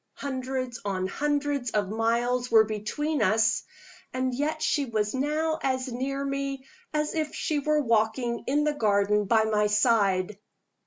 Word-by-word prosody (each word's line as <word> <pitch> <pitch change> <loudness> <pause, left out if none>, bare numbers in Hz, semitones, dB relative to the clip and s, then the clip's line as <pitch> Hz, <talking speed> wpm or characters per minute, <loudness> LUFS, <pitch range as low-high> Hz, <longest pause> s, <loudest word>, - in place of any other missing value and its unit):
Hundreds 260 -2 -4
on 190 -2 -2
hundreds 290 +3 -1
of 210 -3 0
miles 235 +3 0
were 225 -1 +7
between 220 +8 -2
us 220 0 +3 0.5
and 255 0 -1
yet 295 +5 -1
she 300 -2 +1
was 215 -4 -1
now 305 +4 0
as 260 -1 -1
near 275 +3 -3
me 275 -1 -3 0.3
as 300 0 -1
if 310 -2 -2
she 305 -2 -1
were 300 +1 +1
walking 230 +1 0
in 290 +3 +2
the 300 0 +1
garden 210 -4 +2
by 220 +2 +3
my 210 -1 +2
side! 210 -3 +2
250 Hz, 150 wpm, -27 LUFS, 220-280 Hz, 0.5 s, were